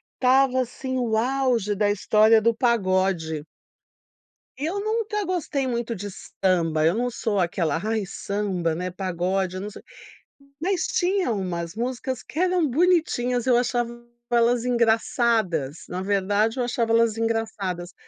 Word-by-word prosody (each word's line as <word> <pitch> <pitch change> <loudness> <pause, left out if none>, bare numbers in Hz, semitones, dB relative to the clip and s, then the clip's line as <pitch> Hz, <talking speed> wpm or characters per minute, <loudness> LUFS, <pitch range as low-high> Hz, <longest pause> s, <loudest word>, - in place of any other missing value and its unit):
estava, 260 0 +3
assim, 260 +1 -4
o 230 -3 0
auge 245 -4 +1
da 205 0 +2
história 215 +2 +4
do 230 +2 +3
pagode 185 - +1 1.2
e 280 - -4
eu 385 +5 -2
nunca 430 -1 -1
gostei 325 -7 -2
muito 235 -2 -2
de 205 0 -6
samba, 170 -5 0
eu 165 +3 +4
não 245 +3 -1
sou 220 -3 -2
aquela: 170 -3 0
"Ai, 220 0 -1
samba, 190 -4 -2
né, 180 +3 -3
pagode", 185 0 -2
eu - - -4
não 205 - -5
so - - -11 0.8
mas 370 +1 0
tinha 370 -4 +1
umas 180 -4 -3
músicas 250 +2 -3
que 310 - -7
eram 360 -3 +2
bonitinhas, 260 -6 +1
eu 250 -2 +4
achava 240 -1 0 0.4
elas 235 0 +3
engraçadas, 225 - +1
na 180 - -4
verdade 205 +3 +1
eu - - +2
achava 235 -2 -1
elas 230 -1 +3
engraçadas. 220 -6 -2
225 Hz, 145 wpm, -24 LUFS, 190-255 Hz, 1.2 s, história